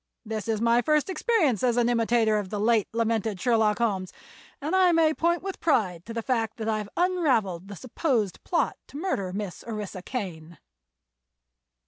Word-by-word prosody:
This 215 -2 -4
is 220 -2 0
my 235 +1 +3
first 305 +6 +1
experience 360 - +1
as 245 -2 +2
an 240 -1 +3
imitator 230 -2 +2
of 200 -3 -5
the 210 - -3
late 220 -1 +3
lamented 225 -3 -1
Sherlock 220 -2 +2
Holmes, 195 -6 -1 0.5
and 305 +6 -1
I 370 -1 +5
may 325 -2 +4
point 340 +2 0
with 390 -1 -5
pride 185 - 0
to 230 - -6
the 230 - -2
fact 230 -3 -1
that 220 -1 -4
I've 215 -2 -1
unraveled 260 - +1
the 200 - -8
supposed 240 - -1
plot 345 - 0
to - - -10
murder 290 - -2
Miss 200 -1 -5
Orissa 210 -4 -5
Kane." 170 - -6
230 Hz, 170 wpm, -26 LUFS, 205-280 Hz, 0.5 s, I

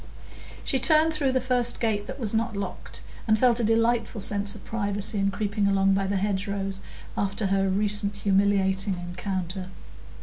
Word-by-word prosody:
She 265 - 0
turned 310 +4 +4
through 285 -4 +1
the 260 - +2
first 250 -1 +3
gate 210 -3 -1
that - - -7
was 225 -4 -1
not 225 0 0
locked, 195 -2 -6 0.2
and 215 0 +4
felt 245 0 +3
a - - 0
delightful 225 0 +1
sense 200 0 -1
of 210 - -12
privacy 205 -1 -2
in 195 0 +2
creeping 205 0 -1
along 195 0 +3
by 195 0 0
the 200 0 0
hedgerows, 195 0 -2 0.3
after 200 +1 -1
her 195 0 +1
recent 205 +1 0
humiliating 195 -1 +1
encounter. 180 +1 -4
205 Hz, 165 wpm, -26 LUFS, 195-225 Hz, 0.3 s, turned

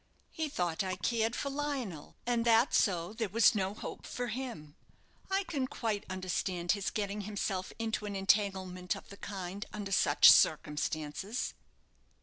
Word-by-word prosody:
He 315 -2 -2
thought 175 - -1
I 185 -1 -2
cared 225 +5 0
for 280 - -2
Lionel, 270 - -4
and 240 -1 +1
that 230 +2 +4
so 180 -2 +2
there 220 -2 -2
was 225 +3 +5
no 195 -1 -1
hope - - -7
for 245 -1 -3
him. 225 - -6 0.5
I 390 +1 +1
can 280 -8 -2
quite 220 -5 -3
understand 185 -1 -1
his 200 -1 0
getting 205 0 -2
himself 195 -2 -3
into 220 -2 -2
an 200 - -4
entanglement 190 -2 +1
of - - -11
the 200 - -11
kind, 195 0 -5
under 205 -2 -5
such 145 -5 +7
circumstances." 155 +7 +1
200 Hz, 150 wpm, -32 LUFS, 185-230 Hz, 0.5 s, such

